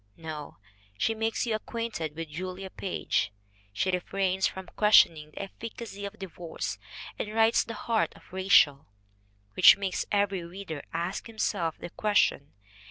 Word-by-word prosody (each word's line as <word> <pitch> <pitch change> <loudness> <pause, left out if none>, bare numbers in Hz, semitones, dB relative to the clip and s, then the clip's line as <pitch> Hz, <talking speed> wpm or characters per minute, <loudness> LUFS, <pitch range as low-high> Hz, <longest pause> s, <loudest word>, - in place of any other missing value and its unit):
No! 155 -2 -7 0.4
She 225 - +1
makes 225 +1 -1
you 230 - 0
acquainted 215 -8 -3
with 165 -1 -5
Julia 185 +4 -6
Page. 185 - -1 0.4
She 185 - 0
refrains 190 +1 +1
from 190 0 -7
questioning 165 -7 +5
the 155 - -6
efficacy 210 0 -7
of 200 +2 -7
divorce 175 -3 -5 0.4
and 210 - -3
writes 225 +1 +4
The 230 - -7
Heart 225 0 0
of - - -19
Rachael, 185 -7 +4 0.7
which - - +8
makes 190 -4 -2
every 200 -3 +1
reader 170 -3 -7
ask 170 +6 -3
himself 200 -7 -1
the 175 - -8
question. 205 -9 +1
190 Hz, 140 wpm, -28 LUFS, 165-210 Hz, 0.7 s, which